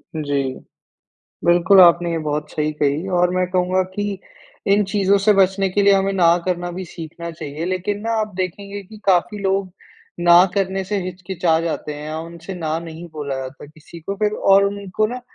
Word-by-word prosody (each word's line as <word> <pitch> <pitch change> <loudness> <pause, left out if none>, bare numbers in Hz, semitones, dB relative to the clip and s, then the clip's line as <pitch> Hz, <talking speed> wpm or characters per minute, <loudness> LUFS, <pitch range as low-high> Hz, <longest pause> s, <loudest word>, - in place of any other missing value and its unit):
जी। 145 -3 -1 1.0
बिल्कुल, 175 +3 +5
आपने 170 0 +6
ये 165 - -1
बहुत 150 0 -2
सही 155 0 -1
कही 150 +4 -1
और 180 0 +3
मैं 185 0 +1
कहूँगा 185 0 +1
कि 205 -1 -3 0.5
इन 205 +1 +4
चीज़ों 200 -1 +3
से 210 +2 +4
बचने 195 0 +3
के 200 +2 +1
लिए 200 0 +6
हमें 195 0 +1
ना 170 -2 +4
करना 175 -1 -2
भी 185 +2 -6
सीखना 170 0 -8
चाहिए। 155 0 -6
लेकिन 185 +3 -2
ना, 230 +2 -2
आप 210 -2 -4
देखेंगे 200 +2 -4
कि 215 +3 -14
काफ़ी 190 +2 +2
लोग 195 -1 -1 0.5
ना 175 +1 +7
करने 195 -1 -1
से 200 +2 -2
हिचकिचा 180 -2 -1
जाते 160 -2 -3
हैं 150 +1 -8
या 155 +1 -4
उनसे 170 +3 -8
ना 160 -2 -2
नहीं 165 +1 -9
बोला 145 -3 -4
जाता 130 +2 -7
किसी 155 +3 -14
को। 195 +5 -4
फिर 210 0 0 0.2
और 195 0 +6
उनको 200 +1 -1
ना 250 +3 -6
180 Hz, 190 wpm, -20 LUFS, 165-195 Hz, 1.0 s, ना